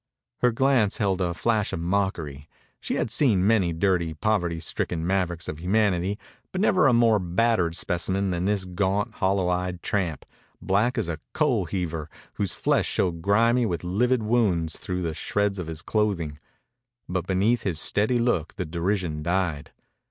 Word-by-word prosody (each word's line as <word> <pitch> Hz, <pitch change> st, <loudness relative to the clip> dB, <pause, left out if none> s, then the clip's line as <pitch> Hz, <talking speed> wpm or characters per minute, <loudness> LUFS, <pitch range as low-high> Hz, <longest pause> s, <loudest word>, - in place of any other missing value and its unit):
Her 125 Hz, -, +3 dB
glance 120 Hz, -4 st, +2 dB
held 95 Hz, -2 st, 0 dB
a 90 Hz, -1 st, +1 dB
flash 110 Hz, +1 st, 0 dB
of -, -, -3 dB
mockery. 85 Hz, -6 st, -2 dB, 0.3 s
She -, -, -3 dB
had 110 Hz, -, -1 dB
seen 110 Hz, -8 st, +3 dB
many 100 Hz, -5 st, +3 dB
dirty, 85 Hz, -2 st, 0 dB
poverty 90 Hz, -2 st, 0 dB
stricken 80 Hz, 0 st, -2 dB
mavericks 90 Hz, -2 st, -1 dB
of 75 Hz, -, -5 dB
humanity, 95 Hz, 0 st, +1 dB, 0.3 s
but 185 Hz, -, -3 dB
never 185 Hz, -5 st, +4 dB
a -, -, +5 dB
more 115 Hz, -2 st, +4 dB
battered 90 Hz, -1 st, +1 dB
specimen 95 Hz, +3 st, -1 dB
than 90 Hz, 0 st, -1 dB
this 100 Hz, -2 st, 0 dB
gaunt, 100 Hz, +5 st, -1 dB
hollow 95 Hz, -2 st, +1 dB
eyed 90 Hz, 0 st, -2 dB
tramp, 90 Hz, -8 st, -1 dB, 0.3 s
black 105 Hz, +6 st, +1 dB
as -, -, 0 dB
a 80 Hz, -2 st, -4 dB
coal 130 Hz, -, +1 dB
heaver, 80 Hz, -3 st, -3 dB, 0.2 s
whose 100 Hz, -3 st, -2 dB
flesh -, -, +1 dB
showed 85 Hz, -3 st, -1 dB
grimy 115 Hz, +6 st, +3 dB
with 85 Hz, -4 st, -3 dB
livid 115 Hz, +7 st, +1 dB
wounds 100 Hz, -8 st, +1 dB
through 90 Hz, -1 st, -4 dB
the 80 Hz, -2 st, -2 dB
shreds 100 Hz, +4 st, -1 dB
of 90 Hz, -, -4 dB
his 80 Hz, 0 st, -6 dB
clothing. 90 Hz, -9 st, -1 dB, 0.7 s
But 90 Hz, -1 st, -3 dB
beneath 100 Hz, +6 st, +2 dB
his 85 Hz, -6 st, -2 dB
steady 110 Hz, +8 st, +2 dB
look 115 Hz, -10 st, 0 dB
the 95 Hz, -3 st, -3 dB
derision 85 Hz, -1 st, -2 dB
died. 85 Hz, -3 st, -1 dB
95 Hz, 165 wpm, -25 LUFS, 85-105 Hz, 0.7 s, a